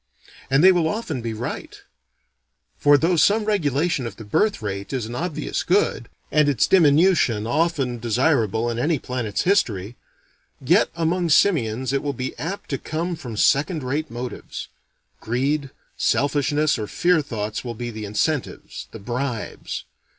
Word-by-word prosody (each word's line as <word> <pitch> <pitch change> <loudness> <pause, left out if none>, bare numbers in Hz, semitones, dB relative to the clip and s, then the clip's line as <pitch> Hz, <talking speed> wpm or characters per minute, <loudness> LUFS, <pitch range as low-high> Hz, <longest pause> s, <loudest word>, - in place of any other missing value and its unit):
And 135 +4 +3
they 190 - +9
will 175 -3 +2
often 160 - -3
be 115 0 -3
right: 110 +2 -6 1.0
for 145 0 +6
though 165 +5 +2
some 210 +7 +4
regulation 160 - 0
of - - -8
the 110 - -10
birth 210 - +1
rate 100 -2 -5
is 125 -4 -2
an 115 - -7
obvious 150 - -3
good, - - +1 0.2
and 150 -1 +4
its 135 -6 +3
diminution 155 - +4
often 135 -2 0
desirable 115 -2 +1
in 120 0 -2
any 155 +5 +1
planet's 120 -5 -3
history, 120 - +1 0.6
yet - - +3
among 170 +1 0
simians 130 - +2
it 140 - +1
will 145 -1 -2
be 130 0 -5
apt 185 +3 -5
to 135 - -1
come 170 +3 -3
from 120 -9 -8
second 150 - +2
rate 145 +5 -2
motives. 120 0 -7 0.5
Greed, 140 +5 -1 0.3
selfishness 145 +2 +1
or 105 - -3
fear 175 +4 +2
thoughts 110 -6 -4
will 120 -2 -5
be 120 +1 -5
the 110 -1 -6
incentives, 125 +8 -2
the - - -9
bribes. 120 +2 -4
135 Hz, 150 wpm, -23 LUFS, 115-160 Hz, 1.0 s, they